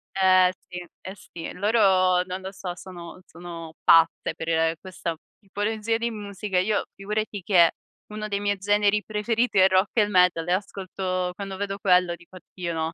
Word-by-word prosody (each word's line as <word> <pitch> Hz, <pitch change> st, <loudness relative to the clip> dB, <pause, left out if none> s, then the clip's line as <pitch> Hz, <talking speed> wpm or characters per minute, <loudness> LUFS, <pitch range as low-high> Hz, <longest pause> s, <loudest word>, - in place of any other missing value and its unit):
Eh, 185 Hz, -1 st, +5 dB, 0.2 s
sì. 180 Hz, -, -7 dB, 0.2 s
Eh, 190 Hz, -, -8 dB
sì. 170 Hz, -3 st, -9 dB
Loro, 190 Hz, -3 st, +3 dB
non 185 Hz, +1 st, -6 dB
lo 190 Hz, 0 st, -6 dB
so, 185 Hz, -2 st, -6 dB
sono 180 Hz, -1 st, -10 dB
sono 165 Hz, -1 st, -9 dB
pazze 165 Hz, 0 st, +4 dB
per 160 Hz, 0 st, 0 dB
questa 180 Hz, -3 st, -5 dB, 0.2 s
tipologia 215 Hz, +2 st, -2 dB
di 235 Hz, +1 st, -2 dB
musica. 205 Hz, -2 st, -4 dB
Io, 205 Hz, +3 st, 0 dB
figurati, 210 Hz, 0 st, -3 dB
che 175 Hz, -3 st, +5 dB, 0.4 s
uno 215 Hz, 0 st, -6 dB
dei 200 Hz, -1 st, -2 dB
miei 205 Hz, 0 st, 0 dB
generi 205 Hz, +1 st, +2 dB
preferiti 220 Hz, +1 st, -1 dB
è 185 Hz, -, +7 dB
il 190 Hz, -, +6 dB
rock 190 Hz, +1 st, +3 dB
e 230 Hz, -, +3 dB
il 205 Hz, -, +1 dB
metal 180 Hz, -4 st, +3 dB
e 175 Hz, -, +2 dB
ascolto 185 Hz, -2 st, -3 dB
quando 195 Hz, -1 st, -6 dB
vedo 200 Hz, 0 st, -3 dB
quello 180 Hz, -2 st, +3 dB
dico: 175 Hz, +2 st, -16 dB
"Oddio, 175 Hz, -1 st, -6 dB
no." 160 Hz, 0 st, -2 dB
190 Hz, 175 wpm, -25 LUFS, 180-205 Hz, 0.4 s, è